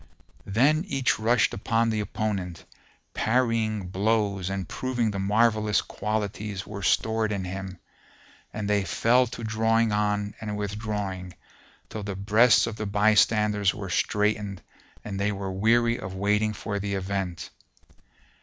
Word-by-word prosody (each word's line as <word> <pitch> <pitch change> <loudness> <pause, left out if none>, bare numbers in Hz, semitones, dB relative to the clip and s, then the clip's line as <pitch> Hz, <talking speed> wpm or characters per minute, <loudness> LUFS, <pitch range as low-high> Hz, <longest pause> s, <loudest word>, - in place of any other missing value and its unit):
''[FN#451] 100 - -6
Then 150 +7 +4
each 135 - 0
rushed 115 +1 +2
upon 115 +3 +1
the 110 - -1
opponent, 100 -4 -3 0.5
parrying 110 -4 +1
blows 100 -1 0
and 95 -3 -3
proving 125 -4 -1
the 100 - -4
marvellous 105 +1 +2
qualities 105 -1 -3
were 100 -1 -7
stored 110 +4 +1
in 100 -2 -2
him; 95 0 -6 0.7
and 105 -1 -4
they 105 -1 +2
fell 125 +5 +3
to 120 0 -7
drawing 110 0 +2
on 105 0 0
and 105 -2 -4
withdrawing 100 -3 -4 0.5
till 110 - -6
the 100 -1 -5
breasts 105 +4 +4
of 110 -2 -5
the 110 - -3
bystanders 105 0 +3
were 95 -3 -6
straitened 105 -1 0 0.4
and 100 -2 -4
they 105 +1 +1
were 95 -1 -4
weary 115 +4 +2
of 95 0 -6
waiting 105 +2 +1
for 100 0 -4
the 100 0 -2
event. 95 -2 -3
105 Hz, 140 wpm, -26 LUFS, 100-110 Hz, 0.7 s, Then